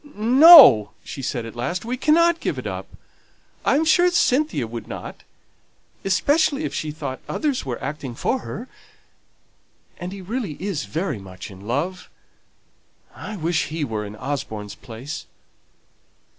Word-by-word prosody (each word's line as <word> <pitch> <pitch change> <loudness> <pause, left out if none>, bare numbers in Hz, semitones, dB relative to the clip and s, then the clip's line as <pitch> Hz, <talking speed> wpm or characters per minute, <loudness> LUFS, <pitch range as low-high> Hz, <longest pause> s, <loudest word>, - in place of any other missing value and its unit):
"No!" 250 - +8
she 135 - -7
said 120 -2 -3
at 115 - -9
last. 170 - -3
"We 245 +2 -2
cannot 335 +5 +3
give - - -3
it - - -6
up. - - -5 0.8
I - - +2
am 315 +3 +2
sure 350 +3 +4
Cynthia 300 - +1
would 115 +1 -8
not; - - -8 0.8
especially 285 - +2
if - - -3
she 155 - -3
thought 145 -3 -6
others 285 - -2
were 120 -2 -3
acting 140 -5 -5
for 260 - -1
her. 240 +1 -7 1.3
And 175 +1 -5
he 200 - -8
really 205 -1 -4
is 185 - -3
very 150 - -3
much 95 +1 -10
in 95 +2 -12
love. 160 +10 -3 1.0
I 215 - -8
wish 165 -1 0
he 155 +1 -4
were 110 -6 -3
in 105 0 -8
Osborne's 110 -5 -5
place." 125 +6 -8
165 Hz, 145 wpm, -22 LUFS, -, 1.3 s, No